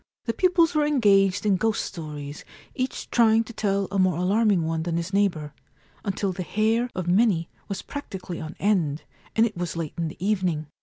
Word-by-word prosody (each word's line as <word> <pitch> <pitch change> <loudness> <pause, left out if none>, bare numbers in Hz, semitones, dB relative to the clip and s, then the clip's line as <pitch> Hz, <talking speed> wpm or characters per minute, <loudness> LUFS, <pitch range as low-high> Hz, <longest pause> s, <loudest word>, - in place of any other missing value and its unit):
The 230 - 0
pupils 355 +3 +3
were 305 -1 +3
engaged 200 -9 +3
in 200 -2 +3
ghost 220 +3 0
stories, 150 -4 -7 0.3
each 255 -1 -4
trying 225 -1 +4
to 235 - -11
tell 200 -2 0
a 200 - 0
more 185 -3 +3
alarming 195 -1 +2
one 160 0 -1
than 165 0 -1
his 170 +3 -4
neighbour, 175 -7 +1 0.5
until 195 -1 -1
the 185 - -5
hair 220 +6 +1
of 185 -2 -3
many 180 -3 +3 0.2
was 195 -1 -4
practically 190 -11 -6
on 155 +1 -7
end, 170 -8 +1 0.3
and 225 - +5
it 220 - -3
was 175 -2 -3
late 160 -3 -3
in 165 - 0
the 155 - -8
evening. 185 -5 0
195 Hz, 190 wpm, -25 LUFS, 170-220 Hz, 0.5 s, and